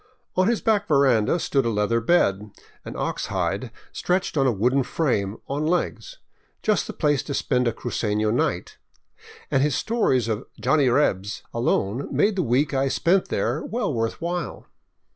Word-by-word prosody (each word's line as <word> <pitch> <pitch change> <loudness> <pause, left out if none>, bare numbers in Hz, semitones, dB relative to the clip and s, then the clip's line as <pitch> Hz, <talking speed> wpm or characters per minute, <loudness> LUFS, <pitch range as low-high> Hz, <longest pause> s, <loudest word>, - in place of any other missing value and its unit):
On 185 +1 +3
his 235 -1 +1
back 205 -2 +1
ver 140 -3 +4
anda 120 +4 +3
stood 140 -5 0
a 115 - 0
leather 110 +2 +1
bed 105 - +2 0.2
— - - -31
an - - -7
ox - - -2
hide - - -2 0.2
stretched 180 -1 -1
on 135 -2 +3
a - - +4
wooden 125 +6 +2
frame 115 -8 -1
on 145 +3 -2
legs 180 - -2 0.2
— - - -41
just 215 -1 +1
the - - -4
place 145 -4 +1
to 140 - -5
spend 125 -2 +1
a - - +2
cruceno 110 -2 -1
night, 120 - -1 0.7
and 135 - +3
his 145 0 +1
stories 135 - +1
of 110 +2 -3
" - - -23
Johnny 145 -4 +3
Rebs 105 -7 0
" - - -43
alone 115 +1 0
made 210 0 +2
the 190 - +1
week 140 +1 +1
I 135 0 +1
spent 180 +7 +2
there 120 +9 -1
well 220 -9 -2
worth 115 -1 -2
while. 175 +1 -4
135 Hz, 185 wpm, -24 LUFS, 115-170 Hz, 0.7 s, ver